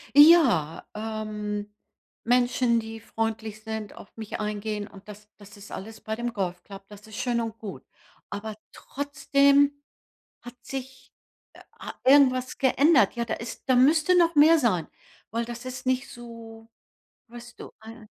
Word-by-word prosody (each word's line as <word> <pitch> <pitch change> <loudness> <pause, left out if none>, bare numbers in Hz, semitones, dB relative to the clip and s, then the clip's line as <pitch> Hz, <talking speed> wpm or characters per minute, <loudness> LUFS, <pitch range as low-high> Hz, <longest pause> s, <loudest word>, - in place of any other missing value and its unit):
Ja, 285 - +6
ähm, 210 -1 -5 0.5
Menschen, 245 0 +2
die 225 0 -7
freundlich 220 -1 -4
sind, 220 -1 -5
auf - - -14
mich 220 -1 -6
eingehen 210 0 -3
und 195 +1 -16
das 210 0 -12
das 205 +1 -15
ist 205 0 -13
alles 220 +3 -8
bei 220 - -4
dem 240 +1 -4
Golfclub, 195 0 -5
das 210 +1 -14
ist 215 - -11
schön 240 -2 0
und 225 -1 -5
gut. 205 -3 -8 0.5
Aber 215 +1 -6 0.2
trotzdem 280 0 +1 0.6
hat 245 0 -11
sich, 265 0 -8 0.4
äh, - - -15 0.2
ha - - -9
irgendwas 255 -2 +4
geändert. 275 +2 +4
Ja, 235 0 -2
da - - -2
ist 230 +1 -8
da 260 - +4
müsste 310 +8 +4
noch 340 -1 +3
mehr 315 +3 +7
sein, 185 - +1 0.4
weil 230 +2 -2
das 240 +1 -8
ist 255 0 -7
nicht 260 +1 0
so, 230 -1 -12 0.6
weißt 240 +1 -12
du, - - -9
äh 225 0 -12
230 Hz, 150 wpm, -26 LUFS, 215-260 Hz, 0.6 s, mehr